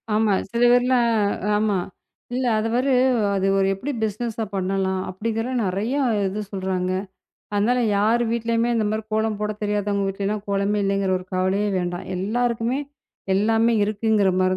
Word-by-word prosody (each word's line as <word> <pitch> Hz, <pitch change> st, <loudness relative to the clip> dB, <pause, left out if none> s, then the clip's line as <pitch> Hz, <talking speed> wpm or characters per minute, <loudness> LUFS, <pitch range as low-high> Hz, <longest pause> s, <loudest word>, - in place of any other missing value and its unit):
ஆமா 215 Hz, -1 st, +3 dB, 0.2 s
சில 235 Hz, -, -1 dB
பேர்லாம் 245 Hz, 0 st, +3 dB, 0.5 s
ஆமா. 210 Hz, -1 st, +1 dB, 0.6 s
இல்ல 255 Hz, +1 st, -1 dB
அது 215 Hz, -, -1 dB
வரு 260 Hz, +3 st, +1 dB, 0.4 s
அது 195 Hz, 0 st, +1 dB
ஒரு 195 Hz, 0 st, +3 dB
எப்படி 255 Hz, +10 st, -4 dB
பிஸ்னெஸ்ஸா 220 Hz, +1 st, -2 dB
பண்ணலாம் 190 Hz, 0 st, -1 dB
அப்டிங்கற 225 Hz, +5 st, -3 dB
நிறைய 200 Hz, +7 st, -1 dB, 0.3 s
இது 200 Hz, +3 st, -3 dB
சொல்றாங்க. 185 Hz, -2 st, -2 dB, 0.6 s
அதனால 220 Hz, +5 st, +2 dB, 0.2 s
யார் 220 Hz, +4 st, +3 dB
வீட்டுலயும் 230 Hz, 0 st, 0 dB
இந்த 220 Hz, -, +1 dB
மாரி 215 Hz, +1 st, -2 dB
கோலம் 220 Hz, -1 st, 0 dB
போடத் 210 Hz, 0 st, -3 dB
தெரியாதவங்க 205 Hz, -1 st, 0 dB
வீட்டுல 195 Hz, +1 st, -3 dB
எல்லாம் 210 Hz, 0 st, -2 dB
கோலமே 200 Hz, +1 st, +1 dB
இல்லைங்கற 195 Hz, -1 st, +1 dB
ஒரு 185 Hz, -, -12 dB
கவலையே 190 Hz, +3 st, +1 dB
வேண்டாம். 175 Hz, -1 st, -3 dB
எல்லாருக்குமே 235 Hz, +5 st, 0 dB, 0.6 s
எல்லாமே 225 Hz, +3 st, +3 dB
இருக்குங்கிற 210 Hz, -1 st, +2 dB
மாரி 185 Hz, 0 st, +2 dB
210 Hz, 145 wpm, -23 LUFS, 195-230 Hz, 0.6 s, ஆமா